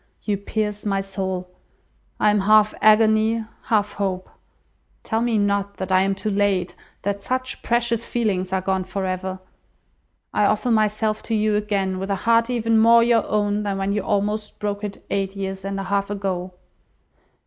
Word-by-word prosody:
You 210 - 0
pierce 210 +1 -3
my 195 -2 0
soul. 190 -2 -4 0.7
I 210 - +4
am 210 - +2
half 215 +2 +4
agony, 220 +1 +4 0.2
half 210 -2 +1
hope. 190 -2 -3 0.7
Tell 225 0 -1
me 235 -2 +1
not 200 -1 0
that 190 0 -4
I 185 0 +5
am 195 0 +1
too 210 +2 -3
late, 195 -3 0 0.3
that 200 0 -2
such 255 +4 -2
precious 235 -1 +1
feelings 200 -7 -1
are 190 0 0
gone 190 0 0
for 190 +1 -4
ever. 185 0 -3 1.0
I 210 - +3
offer 215 +4 +1
myself 215 0 +1
to 225 - -2
you 215 0 +2
again 200 -3 -1
with 195 +1 -4
a 200 - +1
heart 230 +4 +2
even 230 -2 +2
more 230 +1 +6
your 235 -1 +2
own 205 0 0
than 200 -2 -2
when 195 +1 -1
you 205 - 0
almost 210 +1 -1
broke 205 0 -3
it, 205 -1 -6
eight 195 0 -1
years 195 -1 -4
and 195 0 -3
a - - -3
half 200 +1 -1
ago. 190 -3 -3
205 Hz, 175 wpm, -22 LUFS, 195-215 Hz, 1.0 s, more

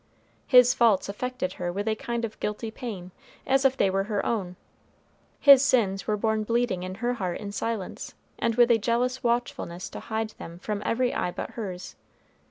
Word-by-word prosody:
His 250 -1 +7
faults 230 -7 +3
affected 250 +6 -3
her 175 0 -1
with 200 +4 -4
a 220 - +2
kind 235 +1 -3
of 220 - -9
guilty 215 +2 -3
pain, 205 -7 -7 0.3
as 270 +1 +2
if 265 0 +3
they - - +3
were 195 +1 0
her 210 -1 -2
own; 190 -6 -2 0.8
his 280 -2 +8
sins 205 -8 +1
were 210 -1 +1
borne 220 +1 0
bleeding 235 -4 0
in 185 +1 -5
her 240 +4 -1
heart 185 -7 -3
in 200 - -6
silence, 215 -1 -4 0.2
and 230 - 0
with 240 0 +5
a 225 - +4
jealous 245 +3 0
watchfulness 235 -7 -2
to - - -8
hide 220 0 -3
them 170 +1 -8
from 205 +3 -4
every 245 +2 0
eye - - -1
but - - -6
hers. 185 -5 -6
220 Hz, 185 wpm, -26 LUFS, 195-245 Hz, 0.8 s, his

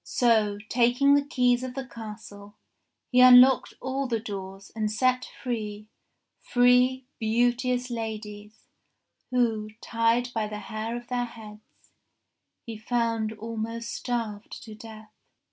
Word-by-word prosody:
So, 220 -4 +2
taking 245 +4 +3
the 285 - +5
keys 250 -4 +1
of 255 -1 -6
the 270 -1 -4
castle, 210 -3 -10 0.6
he 250 - +4
unlocked 255 +1 +7
all 265 +1 -2
the 230 -2 -1
doors 195 -3 -8
and 215 -1 -1
set 255 +3 +1
free 215 -4 -4 0.5
three 250 +1 +3
beauteous 245 +2 0
ladies 215 -2 -7 0.6
who, 225 -4 0
tied 230 +2 +1
by 220 -2 -1
the 210 0 -6
hair 220 +2 -5
of 240 - -9
their 245 -1 -1
heads, 215 -2 -14 0.7
he 225 -2 -7
found 230 -1 -1
almost 230 +1 -5
starved 225 -4 -4
to 220 - -10
death. 220 0 -12
230 Hz, 125 wpm, -26 LUFS, 215-250 Hz, 0.7 s, unlocked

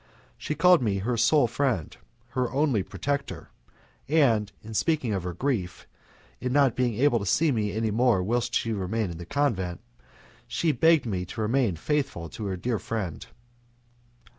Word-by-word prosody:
She 150 - -4
called 180 0 +5
me 105 -5 0
her 115 +6 -1
sole 120 +5 +4
friend, 120 - -1 0.3
her 125 -1 -1
only 135 -6 +1
protector, 140 +8 -4 0.6
and 115 -10 +3
in 110 +1 -9
speaking 140 -2 0
of 95 - -1
her 90 0 -4
grief 110 -8 -2 0.5
in 125 - -2
not 135 -3 +3
being 125 -3 0
able 125 0 +3
to 100 - -5
see 155 - +3
me 105 -4 0
any 110 0 -1
more 115 -4 +2
whilst 120 +4 -1
she 115 - 0
remained 100 0 -2
in 85 - -8
the 85 - -8
convent, 95 - -1 0.7
she 165 - +1
begged 160 +2 +4
me 95 -5 -2
to 110 - -6
remain 115 -3 +1
faithful 135 - -2
to 105 - -7
her 95 -1 -3
dear 115 +3 -2
friend. 105 -8 -4
115 Hz, 165 wpm, -26 LUFS, 100-140 Hz, 0.7 s, called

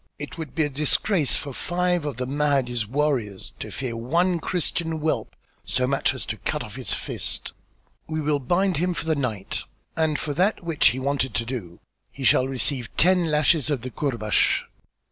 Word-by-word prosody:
"It 145 - -6
would 160 -5 -7
be 160 - +3
a 145 - 0
disgrace 150 +3 +1
for 140 - -4
five 175 0 0
of 145 - -4
the 125 - -1
Mahdi's 135 -5 +1
warriors 125 -7 -1
to - - -5
fear 125 -3 -4
one 170 +10 +1
Christian 165 -1 -1
whelp 155 0 -1 0.3
so 130 - +1
much 135 +1 +1
as - - -3
to - - -4
cut - - -2
off - - -9
his - - -5
fist; - - -2 0.5
we 155 0 -2
will 150 -1 +1
bind 175 +6 +1
him 180 +2 +1
for - - -3
the 160 -1 +2
night, 115 -9 -2 0.3
and 160 -2 +2
for 150 - -2
that 185 +6 +1
which 165 -3 +3
he 125 - +3
wanted 130 -3 0
to 115 - +1
do, 110 -9 -5 0.3
he 140 - -8
shall 130 0 +5
receive 130 -2 -1
ten 180 +1 +5
lashes 150 -1 +3
of 140 -5 0
the 130 +1 -5
courbash." 115 -8 +1
145 Hz, 185 wpm, -25 LUFS, 130-160 Hz, 0.5 s, shall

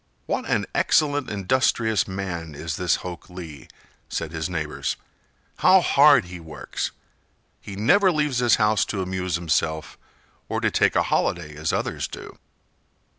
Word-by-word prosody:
"What - - -2
an - - +1
excellent, 145 -3 +2
industrious 110 +1 +1
man 90 -5 -5
is 75 +1 -4
this 90 -1 +2
Hok 90 -1 -7
Lee!" 80 -7 -9 0.4
said 80 -2 -3
his 80 0 -3
neighbors. 80 -4 -3 0.6
"How 190 +1 +6
hard 140 - +5
he 90 0 -9
works! 80 -2 -5 0.7
He 100 - -9
never 185 - +4
leaves 150 -6 0
his 120 -2 +4
house 105 -1 +2
to 95 -3 -3
amuse 90 -1 -2
himself 80 -2 -1 0.5
or - - -1
to - - +1
take - - +2
a - - +4
holiday 75 -3 -1
as 80 +2 -1
others - - -2
do!" - - -10
90 Hz, 145 wpm, -24 LUFS, 80-120 Hz, 0.7 s, How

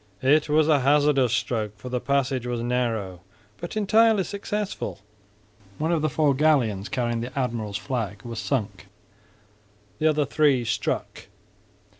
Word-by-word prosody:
It 150 +3 +3
was 155 +1 +3
a 150 -3 +4
hazardous 140 -2 +3
stroke, 110 -4 -2
for 125 +5 -8
the 125 0 -1
passage 130 -1 0
was 120 -1 -2
narrow, 115 -7 -2 0.4
but 175 +5 -6
entirely 215 0 +4
successful. 200 - -4 0.8
One 160 +2 -1
of 165 -3 +1
the 155 - +1
four 150 0 +2
galleons, 130 -9 +1
carrying 120 -2 -1
the 125 +3 -7
admiral's 115 -6 -2
flag, 105 -5 -4
was 115 -2 -6
sunk, 125 -8 -3 1.1
the 155 - +3
other 150 -1 +2
three 140 -3 +2
struck. 110 -2 -3
130 Hz, 140 wpm, -25 LUFS, 115-155 Hz, 1.1 s, a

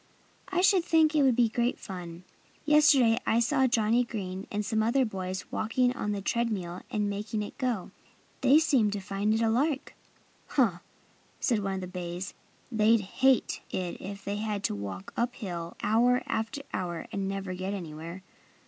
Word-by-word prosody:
I 365 -1 0
should 375 -1 +5
think 320 -2 +4
it 305 - +4
would 265 -3 +4
be 240 -1 +4
great 240 +2 0
fun. 175 -3 -8 0.4
Yesterday 290 -6 +5
I 230 - +3
saw 265 +2 +3
Johnnie 230 0 +3
Green 195 -4 -5
and 210 0 -2
some 220 0 +1
other 240 +4 +3
boys 190 -3 -4
walking 245 +3 +1
on 210 -4 -2
the 200 -1 -3
tread 235 +2 0
mill 180 -3 -4
and 210 -2 0
making 210 +2 -3
it 205 - -8
go. 245 -7 -1 0.5
They 270 +3 +6
seemed 270 -10 +3
to 205 - -2
find 195 +2 -1
it 220 +1 +2
a - - +3
lark." 275 +4 0 0.5
"Huh!" 220 - +2 0.6
said 235 -6 +1
one 195 -1 -2
of 190 - -4
the - - -4
bays. 180 +1 -5 0.4
"They'd 220 0 +4
hate 260 +6 +2
it 180 -2 -4
if 200 +1 -7
they 200 +1 -2
had 210 -2 -2
to - - 0
walk 100 -2 -6
up 240 +1 -1
hill 175 -6 -6
hour 245 +3 +3
after 225 +6 -3
hour 175 -2 -3
and 195 -1 -2
never 195 -1 -3
get 190 +2 -3
anywhere. 170 +1 -7
215 Hz, 180 wpm, -29 LUFS, 190-245 Hz, 0.6 s, They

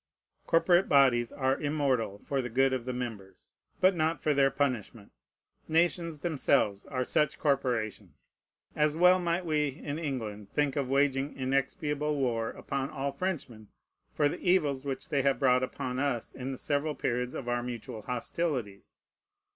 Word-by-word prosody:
Corporate 175 +2 +4
bodies 130 -4 +4
are 130 0 0
immortal 140 -8 0
for 135 +6 -2
the 125 - -5
good 135 +3 +2
of 125 -2 -2
the 130 - -2
members, 110 -7 -7 0.3
but 185 0 +4
not 160 0 0
for 150 - +1
their 135 -1 +4
punishment. 125 -6 -2 0.6
Nations 165 -1 +1
themselves 140 - +1
are 130 -2 -1
such 150 +4 +1
corporations. 110 - -2 0.4
As 150 0 +2
well 180 +2 +6
might 175 0 -1
we 150 -2 +1
in 145 +2 -5
England 110 -9 -4
think 145 +2 0
of 140 -3 -1
waging 140 0 +1
inexpiable 140 +3 -1
war 115 -4 0
upon 140 0 -4
all 140 +1 -3
Frenchmen 135 - -4 0.4
for 145 - +2
the - - -4
evils 150 -7 +1
which 135 +1 -4
they 145 -4 +2
have 135 -1 +2
brought 125 -1 +3
upon 130 0 -3
us 135 -5 -1
in 130 +1 -5
the 130 - -5
several 145 +2 -1
periods 125 +1 -2
of 120 - -5
our 120 0 0
mutual 120 -3 -6
hostilities. 125 - -3
135 Hz, 155 wpm, -30 LUFS, 125-150 Hz, 0.6 s, well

